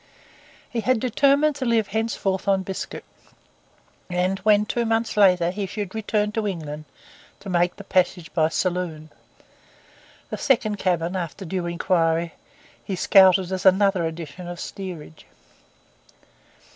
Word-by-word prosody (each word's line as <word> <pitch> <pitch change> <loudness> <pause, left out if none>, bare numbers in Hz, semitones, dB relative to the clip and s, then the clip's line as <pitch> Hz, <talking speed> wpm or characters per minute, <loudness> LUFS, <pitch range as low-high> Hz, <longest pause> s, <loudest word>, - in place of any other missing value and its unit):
He 240 - -4
had 255 +1 +1
determined 280 +5 +3
to 265 - -3
live 230 -3 +1
henceforth 205 -3 -2
on 195 -1 +2
biscuit; 190 0 -6 1.1
and 180 +2 0
when, 210 0 +3
two 235 +3 -1
months 225 0 0
later, 180 -4 +4
he 200 +1 -4
should 205 -1 -5
return 210 -1 -1
to 220 -1 -2
England, 155 -5 -5 0.6
to 195 - -7
make 175 0 +1
the 200 - -10
passage 180 -3 0
by 155 -2 +3
saloon. 170 -3 -2 1.2
The - - -3
second 215 -6 +1
cabin, 175 -1 0
after 180 +2 -5
due 180 0 -3
inquiry, 170 -1 0 0.5
he 195 - -3
scouted 190 0 +5
as 190 0 -3
another 195 -1 +4
edition 165 +1 -6
of 175 0 -6
the - - -8
steerage. 180 -6 -8
190 Hz, 135 wpm, -23 LUFS, 175-210 Hz, 1.2 s, scouted